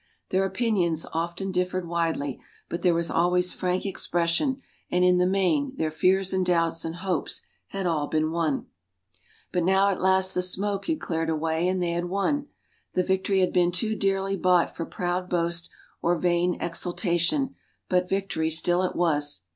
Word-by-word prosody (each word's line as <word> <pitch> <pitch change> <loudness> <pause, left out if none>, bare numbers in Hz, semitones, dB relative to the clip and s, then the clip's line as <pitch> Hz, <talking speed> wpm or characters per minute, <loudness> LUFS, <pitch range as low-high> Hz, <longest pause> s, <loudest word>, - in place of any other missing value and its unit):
Their 190 +1 +2
opinions 190 -7 0
often 170 +4 -2
differed 180 -1 -1
widely, 165 -5 -1 0.3
but 170 - -4
there 175 -2 +3
was 170 0 0
always 180 +1 +2
frank 180 +1 -1
expression 185 - 0 0.3
and, 180 0 +2
in 180 0 +4
the 180 - +3
main, 195 +9 +1
their 160 -9 -1
fears 190 +4 +2
and 190 0 +2
doubts 165 -2 +1
and 165 0 -4
hopes 180 -2 -2 0.2
had 195 -1 -4
all 155 -4 0
been 155 0 0
one. 160 -4 -1 0.9
But 180 -2 0
now 190 +2 +4
at 190 - -3
last 190 0 +3
the 180 - +1
smoke 195 +2 0
had 320 -2 0
cleared 165 -1 -2
away, 160 +2 0
and 185 0 0
they 170 - 0
had 175 +1 -1
won. 200 +11 -1 0.5
The 185 - +2
victory 190 +1 +1
had 185 - +1
been 175 -1 +3
too 220 +4 -1
dearly 195 -1 0
bought 180 -2 +2
for 165 - -4
proud 180 +1 -2
boast 170 -1 -1 0.3
or 175 +1 +2
vain 175 +1 +1
exultation, 175 - 0 0.3
but 180 0 +1
victory 195 -5 -1
still 175 +3 +3
it 185 - -1
was. 145 - 0
180 Hz, 170 wpm, -26 LUFS, 170-190 Hz, 0.9 s, in